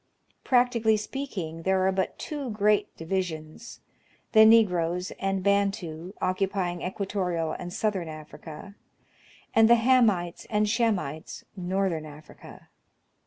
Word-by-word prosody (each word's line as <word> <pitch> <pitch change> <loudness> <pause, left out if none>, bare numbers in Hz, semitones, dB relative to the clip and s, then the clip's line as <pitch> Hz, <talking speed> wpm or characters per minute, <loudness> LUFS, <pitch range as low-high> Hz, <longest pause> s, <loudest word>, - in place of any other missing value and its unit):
Practically 245 -3 +3
speaking, 210 - -5
there 190 +1 +1
are 190 - +3
but 190 0 -2
two 290 -4 -5
great 210 -1 +1
divisions, 165 +2 -5 0.2
— - - -36
the 220 -1 +8
Negroes 180 -5 +3
and 195 -1 -1
Bantu, 195 -4 0
occupying 185 -2 -1
equatorial 180 -4 -2
and 175 0 -6
southern 190 -3 -1
Africa; 155 +4 -10 0.8
and 225 0 +5
the 235 - +8
Hamites 225 -8 +2
and 210 -1 +1
Shemites, 205 - -1
northern 185 -4 -1
Africa. 150 +1 -14
190 Hz, 115 wpm, -27 LUFS, 170-215 Hz, 0.8 s, the